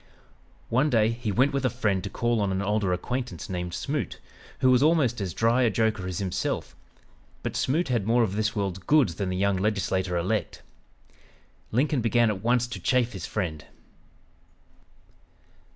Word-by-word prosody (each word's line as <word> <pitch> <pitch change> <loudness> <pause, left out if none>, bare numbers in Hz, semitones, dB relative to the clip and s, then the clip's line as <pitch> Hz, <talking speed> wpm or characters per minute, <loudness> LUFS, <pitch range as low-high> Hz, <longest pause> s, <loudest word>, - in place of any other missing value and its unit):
One 130 +6 +2
day 110 -3 +3
he 115 -2 -3
went 130 +7 +2
with 140 - -1
a 130 - +3
friend 105 -7 -1
to - - -4
call 120 -2 0
on 100 -1 0
an 95 +1 -1
older 105 -2 0
acquaintance, 120 +4 -3
named 90 -1 -3
Smoot, 140 - -3 0.4
who 130 -1 +4
was 125 0 +4
almost 145 -7 +3
as 95 -3 -2
dry 115 +8 +2
a 120 - +4
joker 110 -3 0
as 90 -2 -4
himself, 95 -3 -2 0.7
but - - -3
Smoot 155 +4 0
had 115 -5 0
more 120 +1 +4
of 100 -3 -1
this 110 +1 0
world's 100 -3 -2
goods 130 - +3
than 95 +2 -3
the 90 - -2
young 100 0 +1
legislator 95 -3 0
elect. 95 +5 -2 1.1
Lincoln 135 +3 +1
began 115 0 +3
at 95 -2 -5
once 120 +2 +2
to 120 - -6
chaff 125 -2 +1
his 95 -4 -6
friend. 80 -8 -3
110 Hz, 170 wpm, -26 LUFS, 95-125 Hz, 1.1 s, who